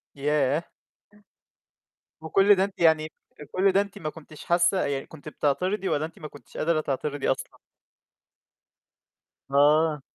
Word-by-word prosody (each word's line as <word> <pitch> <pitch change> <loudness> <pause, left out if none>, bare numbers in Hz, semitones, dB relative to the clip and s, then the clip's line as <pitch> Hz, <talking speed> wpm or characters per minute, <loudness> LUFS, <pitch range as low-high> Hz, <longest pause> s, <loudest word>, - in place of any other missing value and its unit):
ياه! 145 +2 0 1.5
وكُلّ 195 +5 +4
ده 190 - +2
أنتِ 195 0 -5
يعني 155 -2 +3 0.4
كُلّ 195 +1 +3
ده 195 +1 +3
أنتِ 200 -2 -7
ما 155 - -3
كنتيش 155 -1 -13
حاسة، 175 +2 +2
يعني 140 -1 -3
كنت 155 -1 -11
بتعترضي 180 +8 -1
والَّا 150 +2 0
أنتِ 165 - -12
ما 155 - -7
كنتيش 130 -8 -15
قادرة 160 -1 +1
تعترضي 145 0 -3
أصلًا؟ - - -4 2.0
آه. 150 +2 +3
155 Hz, 130 wpm, -26 LUFS, 145-175 Hz, 2.0 s, وكُلّ